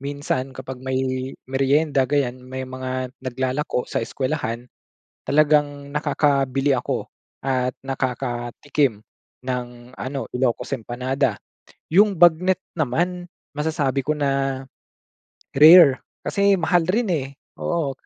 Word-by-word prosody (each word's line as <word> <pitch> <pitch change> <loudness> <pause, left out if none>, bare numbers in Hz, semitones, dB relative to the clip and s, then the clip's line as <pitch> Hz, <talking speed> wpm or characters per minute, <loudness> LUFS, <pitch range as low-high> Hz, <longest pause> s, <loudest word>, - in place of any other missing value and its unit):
minsan 140 -2 -3
kapag 130 0 -7
may 130 0 -2 0.5
meryenda 135 +1 +1
ganyan 130 -3 0
may 130 +1 -6
mga 130 0 -4
naglalako 130 +1 -2
sa - - -2
eskuwelahan 120 -1 -3 0.6
talagang 145 -1 +2
nakakabili 140 -2 +1
ako 125 - -2 0.4
at 130 -1 +1 0.2
nakakatikim 125 -1 -1 0.5
ng 125 -1 -1 0.3
ano, 135 +1 -4
Ilocos 125 +1 0
empanada. 125 0 -1 0.5
Yung 200 +3 +5
bagnet 175 +2 +4 0.2
naman, 175 +6 -1 0.2
masasabi 150 -3 -1
ko 155 - +1
na 135 -2 -1 0.9
rare 150 -1 +8 0.2
kasi 200 0 +3
mahal 175 -1 +1
rin, 215 0 +1
eh, 140 -5 -1 0.3
oo, 165 -5 -1
135 Hz, 105 wpm, -22 LUFS, 130-150 Hz, 0.9 s, rare